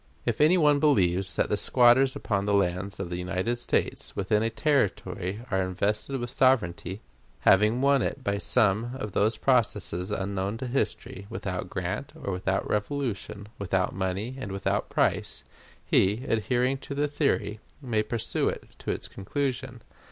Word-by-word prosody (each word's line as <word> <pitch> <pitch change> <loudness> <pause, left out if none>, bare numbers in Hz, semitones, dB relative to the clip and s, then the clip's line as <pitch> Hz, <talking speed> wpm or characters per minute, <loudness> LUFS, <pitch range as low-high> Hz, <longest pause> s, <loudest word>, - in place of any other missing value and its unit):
If - - 0
any 160 +5 +6
one 150 -3 +4
believes 95 - +2
that - - +1
the 105 - +1
squatters 125 +4 +5
upon 100 -1 -1
the 100 - +3
lands 95 +1 0
of 85 - -4
the 85 - -2
United 95 +6 -1
States - - -1
within 105 +2 +1
a 115 - +1
Territory 110 -5 -1
are 95 -1 +2
invested 105 +8 -1
with 120 0 -4
sovereignty, 100 -6 +1 0.4
having 105 +5 +4
won 140 -1 +4
it 135 - -3
by 100 -2 0
some 115 +2 +2
of 105 -6 -5
those 110 +4 +1
processes 105 -8 +1
unknown 100 +2 -2
to 130 - -5
history, 105 -5 -2
without 90 -1 -4
grant, 95 +11 -4
or 100 - -4
without 95 +1 -1
revolution, 105 -3 -3
without 95 -1 0
money 95 +7 -3
and 105 -7 -5
without 95 -1 -1
price, - - 0 0.4
he, 105 +7 +2
adhering 125 +4 +1
to 140 - -7
the 145 +1 +1
theory, 140 -7 0 0.2
may 120 -6 0
pursue 115 +1 -1
it - - -5 0.2
to - - -6
its - - -2
conclusion. 130 +2 -3
105 Hz, 160 wpm, -27 LUFS, 95-130 Hz, 0.4 s, any